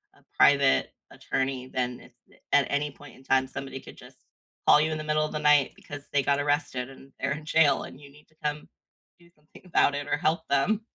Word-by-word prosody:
a - - -25
private 140 -1 +4 0.2
attorney, 130 -1 -3
then 125 -1 -4 0.2
a - - -23
a - - -3
at 145 - +4
any 145 +1 -1
point 145 +1 -15
in 130 - -18
time, 130 0 +2
somebody 135 0 -7
could - - -13
just - - -15 0.5
call 150 - +7
you 155 +1 0
in 155 - -2
the 155 - -5
middle 155 0 +1
of 155 - -6
the 150 - -3
night 150 -2 +4
because 145 0 -10
they 145 - +2
got 140 +1 +1
arrested 145 -3 -1
and 135 0 -15
they're 135 - -1
in 150 +2 -4
jail 160 -1 +3
and 135 - -11
you 140 - -13
need 150 +1 -20
to 155 - -31
come 150 0 -3 0.5
do 170 0 -21
something 150 -1 -19
about 165 -5 +2
it 145 0 -4
or - - 0
help 160 +1 0
them. 140 +11 +2
145 Hz, 230 wpm, -27 LUFS, 135-150 Hz, 0.5 s, call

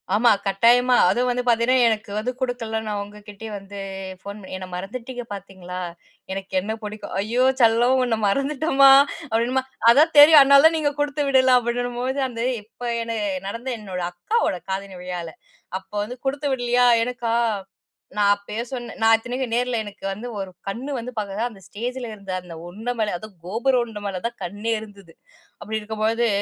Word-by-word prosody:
ஆமா. 235 +2 +5
கட்டாயமா. 240 +6 +4
அதும் 250 +1 +1
வந்து 245 0 0
பாத்தீங்கன்னா 240 +1 +4
எனக்கு 220 -1 -2
வந்து 240 +4 -1
குடுக்கல, 240 -3 -2
நான் 210 -1 -3
அவுங்ககிட்டயே 210 +1 -8
வந்து 200 0 -10 0.4
போன் 200 +1 -7
பண்ணி, 190 -1 -8
"என்ன 185 -1 -7
மறந்துட்டீங்க 240 +6 -6
பாத்தீங்களா? 185 -2 -8 0.5
எனக்கு 195 0 -5
என்ன 215 +3 -3
புடிக்கும்" 210 -2 -7
"ஐயோ 235 +5 +1 0.2
செல்லம்! 235 +3 +4
உன்ன 230 -3 0
மறந்துட்டோம்மா" 275 +3 +4 0.4
அப்டின்னம்ம, 245 +4 +1 0.3
"அதான் 305 +7 +4
தெரியும். 300 +1 +10
அதனால 280 +2 +7
தான் 325 0 +1
நீங்க 295 -2 +1
குடுத்து 290 0 0
விடல" 260 -1 +5
அப்டின்னும் 245 0 -2
பொழுது, 265 +2 -1
அந்த 230 - -8 0.2
இப்ப, 225 +3 -31 0.2
என்ன 230 0 -3 0.3
நடந்த 230 +6 -5
என்னோட 185 -3 -5
அக்காவோட 185 - 0
காதணி 195 -1 -4
விழால. 175 -2 -5 0.5
அப்போ 190 +2 -15
வந்து 250 +3 -8
குடுத்து 285 +2 -1
விடலியா, 245 -1 +2 0.2
எனக்கா? 235 -1 -2 0.8
நான் 205 -1 +4
அப்பயே 205 +3 -5
சொன்னேன், 240 -3 -6
நான் 225 0 +6
இத்தனைக்கும் 245 +1 -4
நேர்ல 245 0 0
எனக்கு 205 -1 -12
வந்து 215 +5 -6
ஒரு 190 -1 -4 0.2
கண்ணு 245 +8 -4
வந்து 245 +1 -5
பாத்தீங்கன்னா, 210 +2 -2
அந்த 195 -3 -15
ஸ்டேஜில 240 +3 -5
இருந்த 200 -2 -9
அந்த 175 -2 -10
உண்ட 215 +7 -6
மேல, 210 -2 0
அதும் 215 +2 -11
கோபுர 235 +7 +1
உருண்ட 225 -3 -6
மேல 195 -2 -3
தான் 235 0 -2
கண்ணே 205 +5 -3
இருந்தது. 200 -5 -13 0.5
அப்டி 220 0 -3
இருக்கும்பொழுது, 220 +2 0
230 Hz, 165 wpm, -23 LUFS, 205-250 Hz, 0.8 s, தெரியும்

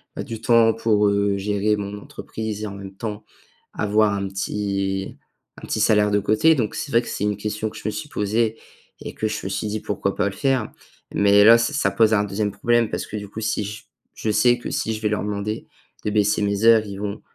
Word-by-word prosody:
bah, - - -4
du 115 -1 -7
temps 115 -1 +5
pour, 110 -2 +2
heu, 100 0 +1
gérer 105 +1 0
mon 100 0 -5
entreprise 110 0 -6
et, - - -2
en 100 - -7
même 100 -1 -9
temps, 105 -1 -5 0.5
avoir 105 0 +2
un 100 -1 -2
petit 95 0 -3 0.4
un - - -10
petit - - -1
salaire 105 -2 +4
de 105 - +3
côté. 110 +11 +3
Donc 115 -6 -1
c'est 145 - -4
vrai 115 - +4
que - - -11
c'est - - -3
une 105 -1 0
question 105 +1 -3
que - - -12
je - - -10
me 110 - 0
suis 105 - -6
posée 110 +2 0 0.4
et - - -7
que 110 - -1
je - - -3
me 95 - -2
suis 105 - -2
dit: 105 +1 -2
«Pourquoi 100 -1 -2
pas - - 0
le 100 - -9
faire?» 135 -5 0 0.4
mais 100 0 +5
là, 115 +1 +9
ça 115 +6 0
ça 145 - +1
pose 110 -1 +3
un 100 - +2
deuxième 105 +1 -2
problème 120 +2 +1
parce - - -3
que, 110 - -7
du 105 -1 -7
coup, 105 - -7
si 110 -1 -1
je 105 - -5
s - - -22 0.3
je 110 - -1
sais 120 +4 +4
que - - -6
si 110 - -1
je 110 - -6
vais 105 - +1
leur 105 - -1
demander 105 +1 -4 0.4
de 105 - 0
baisser 105 0 +2
mes 100 +2 0
heures. 115 -2 +6
Ils 100 -1 -7
vont, 100 -1 -4
105 Hz, 245 wpm, -22 LUFS, 100-110 Hz, 0.5 s, là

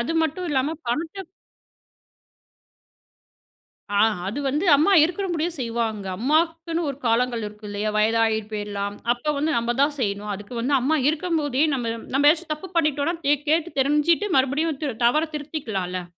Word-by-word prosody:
அது 250 +8 -1
மட்டும் 320 +3 -2
இல்லாம, 285 +3 0
பணத்த 320 +10 -2 2.8
ஆ, 200 - +4 0.3
அது 225 +9 -3
வந்து 300 +8 -1
அம்மா 310 +8 +3
இருக்குற 360 +4 -1
முடியும் 335 +1 -1
செய்வாங்க. 230 -4 -2
அம்மாக்குன்னு 330 - 0
ஒரு 275 - -5
காலங்கள் 235 0 +1
இருக்கு, 210 +1 -12
இல்லையா? 205 +1 -2
வயதாகி 220 0 +2
போயிரலாம். 205 -1 -4 0.2
அப்ப 270 +5 -2
வந்து, 310 +3 0
நம்ப 235 +1 0
தான் 290 +1 +2
செய்யணும். 205 -2 -2
அதுக்கு 205 +4 -8
வந்து, 270 +4 0
அம்மா 310 +5 +2
இருக்கும் 330 +1 -1
போதே, 285 -1 +1
நம்ப 235 -3 -2 0.2
நம்ப 285 - +2
ஏதாச்சும் 330 -1 -4
தப்பு 305 +5 -9
பண்ணிட்டோம்னா, 305 +1 +1
தே 290 - +5 0.2
கேட்டுத் 325 0 0
தெரிஞ்சுட்டு, 300 +8 +2
மறுபடியும் 280 +3 +1
தி 280 -4 -1
தவறத் 305 +6 +2
திருத்திக்கலால? 210 - -4
280 Hz, 150 wpm, -23 LUFS, 230-320 Hz, 2.8 s, தே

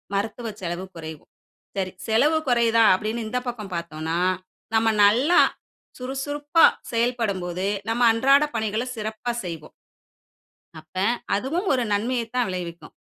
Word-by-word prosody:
மருத்துவ 220 +4 -2
செலவு 175 +1 -4
குறைவு. 160 -2 -8 0.5
சரி, 190 -1 -1 0.2
"செலவு 285 +9 +3
குறையுதா?" 230 -1 +4
அப்படீன்னு 220 +4 -2
இந்த 250 +3 -1
பக்கம் 215 -6 -5
பாத்தோம்ன்னா, 165 0 -3 0.6
நம்ம 225 0 +3 0.2
நல்லா, 250 +12 +5 0.6
சுறுசுறுப்பா 290 +4 +2 0.3
செயல்படும் 230 -4 0
போது, 180 +2 -3 0.2
நம்ம 230 +2 0
அன்றாட 275 +5 +4
பணிகள 220 +1 -1
சிறப்பா 220 +2 -4
செய்வோம். 165 -3 -7 1.0
அப்ப, 155 +3 -21 0.4
அதுவும் 325 - -2
ஒரு 250 - +1
நன்மைய 235 +4 0
தான் 250 - +2
விளைவிக்கும். 175 -2 -6
225 Hz, 120 wpm, -24 LUFS, 185-250 Hz, 1.0 s, நல்லா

